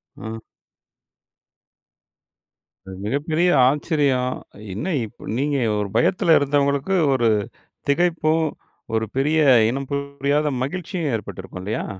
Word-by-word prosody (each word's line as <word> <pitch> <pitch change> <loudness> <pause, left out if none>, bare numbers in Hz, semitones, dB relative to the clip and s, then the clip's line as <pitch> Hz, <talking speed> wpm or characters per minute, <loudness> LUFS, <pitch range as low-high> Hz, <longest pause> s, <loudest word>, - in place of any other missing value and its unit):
அ. 110 0 -7 2.5
அ - - -11
மிகப்பெரிய 155 - 0 0.2
ஆச்சரியம்! 140 -4 +1 0.4
என்ன 160 - -3
இப் 110 - -10
நீங்க 145 +2 0 0.2
ஒரு 105 -1 -1
பயத்தில 165 - +4
இருந்தவங்களுக்கு 140 +4 +1 0.2
ஒரு 120 -3 +2 0.6
திகைப்பும், 160 0 +2 0.5
ஒரு 110 0 +1
பெரிய 150 +4 +2 0.3
இனம் 135 +2 -4
புரியாத 140 +1 0
மகிழ்ச்சியும் 170 +1 -3
ஏற்பட்டிருக்கும், 95 -3 -7
இல்லயா! 105 +3 -3
140 Hz, 95 wpm, -22 LUFS, 125-155 Hz, 2.5 s, பயத்தில